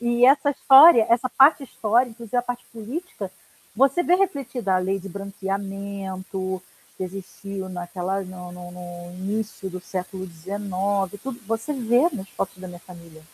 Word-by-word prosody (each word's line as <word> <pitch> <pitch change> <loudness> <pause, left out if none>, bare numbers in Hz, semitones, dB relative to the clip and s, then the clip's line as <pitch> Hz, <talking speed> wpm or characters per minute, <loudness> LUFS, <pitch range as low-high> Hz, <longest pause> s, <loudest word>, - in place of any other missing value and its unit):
E 240 0 +3
essa 275 +2 +5
história 270 -3 +8
essa 240 +2 +3
parte 275 +3 +6
histórica 235 0 +1
quer 235 - -8
dizer, 230 +2 -4
a 245 - +2
parte 245 0 -5
política, 230 - -6 0.5
você 275 +7 +4
vê 350 +1 +4
refletida 270 - 0
a 185 - +4
lei 190 +2 0
de 195 - -9
branqueamento, 195 -1 -4 0.3
que 185 - -3
existiu 195 +1 -7
naquela 180 +2 -3
no 180 -1 -9
no 175 0 -9
no 175 0 -9
início 205 0 -3
do 185 0 -6
século 185 +1 -5
19, 195 +2 -2
tudo 265 -2 -6
você 225 +7 -2
vê 245 +4 +3
nas 195 -6 -6
fotos 190 +1 -4
da 185 - -8
minha 175 -1 -10
família. 170 -3 -14
195 Hz, 160 wpm, -24 LUFS, 185-240 Hz, 0.5 s, história